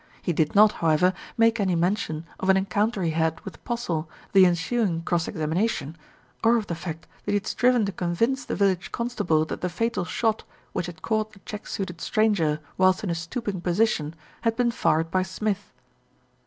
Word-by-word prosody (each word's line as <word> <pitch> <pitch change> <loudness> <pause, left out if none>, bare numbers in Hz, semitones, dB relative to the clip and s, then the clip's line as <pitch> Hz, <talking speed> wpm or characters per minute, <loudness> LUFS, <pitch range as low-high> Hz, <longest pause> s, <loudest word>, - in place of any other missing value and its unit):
He 175 - -1
did 155 +2 0
not, 210 +1 +7
however, 165 +2 +2 0.2
make 230 0 +4
any 190 -3 +2
mention 170 -2 0
of 190 - -1
an 190 - +6
en 190 - +1
counter 205 +1 0
he 165 - +1
had 160 0 0
with - - -10
Postle, 175 -10 -2 0.2
the 190 -2 +8
ensuing 175 0 0
cross 170 -1 0
examina 165 +5 0
tion, 150 -5 -5 0.5
or 230 +1 +5
of 220 - -2
the 175 - -3
fact 165 -1 -6 0.2
that - - -1
he - - +3
had 205 +1 0
striven 245 -3 +3
to 200 - -2
convince 210 +10 0
the - - -3
village 195 -3 +1
constable 180 -10 0
that - - -6
the 180 - -1
fatal 230 +2 -1
shot, 220 +4 0 0.3
which 175 - -2
had 165 -3 -10
caught 215 -1 -1
the 195 - -16
check 210 -1 -7
suited 180 -3 -4
stranger 195 -9 +2 0.2
whilst 185 +1 +4
in 190 - -1
a - - +1
stooping 185 +4 -4
position, 175 -4 +1 0.3
had 230 -1 +1
been 240 0 +2
fired 165 -7 +1
by 185 - +2
Smith. 200 +2 -3
185 Hz, 195 wpm, -25 LUFS, 165-220 Hz, 0.5 s, the